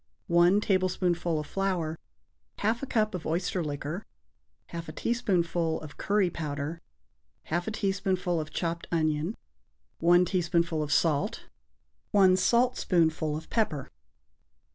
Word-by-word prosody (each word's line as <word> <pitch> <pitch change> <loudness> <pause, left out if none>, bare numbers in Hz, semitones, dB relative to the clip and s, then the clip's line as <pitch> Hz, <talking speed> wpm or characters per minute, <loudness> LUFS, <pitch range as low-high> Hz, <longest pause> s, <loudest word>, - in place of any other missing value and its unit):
1 175 +4 +4
tablespoonful 180 -4 +1
of 150 - -4
flour. 175 -3 -2 0.6
1/2 225 +3 0
a - - -2
cup 215 -4 +1
of 180 -3 -4
oyster 175 +2 -1
liquor. 150 +5 -4 0.7
1/2 170 -1 -5
a - - -5
teaspoonful 175 -7 0
of 155 -2 -10
curry 200 -3 +1
powder. 150 +1 -4 0.7
1/2 175 +2 0
a - - -1
teaspoonful 190 -4 0
of 155 - -7
chopped 170 0 -3
onion. 155 +3 0 0.6
1 175 +2 +5
teaspoonful 170 -3 +1
of 150 -1 -3
salt. 165 - +1 0.7
1 190 -2 +5
saltspoonful 180 -8 +2
of 160 - -9
pepper. 155 - -1
175 Hz, 120 wpm, -28 LUFS, 160-195 Hz, 0.7 s, 1